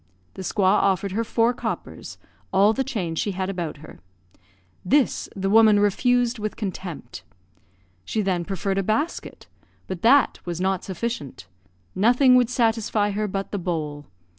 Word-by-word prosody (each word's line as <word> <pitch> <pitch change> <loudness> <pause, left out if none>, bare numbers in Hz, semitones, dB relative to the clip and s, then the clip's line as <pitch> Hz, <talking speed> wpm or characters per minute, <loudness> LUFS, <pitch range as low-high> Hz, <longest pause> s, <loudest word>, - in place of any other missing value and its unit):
The - - -8
squaw 190 +1 +2
offered 195 0 +1
her 225 +4 -1
four 230 +1 +1
coppers, - - -6 0.3
all 200 +3 +4
the 265 - -1
change 185 - -3
she 205 - -1
had 190 +1 -2
about 170 -5 -4
her. - - -14 0.8
This 275 +7 +1
the 195 -1 -2
woman 215 0 +6
refused 245 +4 +2
with 215 0 -4
contempt. 180 - -6 0.8
She 215 - -2
then 185 -3 0
proffered 195 +1 -2
a - - +2
basket; 225 - -2 0.4
but 185 -2 -6
that 260 +3 +4
was 175 -1 -5
not 190 0 0
sufficient; 190 - -5 0.5
nothing 250 +6 +4
would 250 -2 +4
satisfy 225 -3 +1
her 210 +1 -2
but 195 0 -4
the 205 - -2
bowl. 150 -5 -4
200 Hz, 150 wpm, -23 LUFS, 185-230 Hz, 0.8 s, woman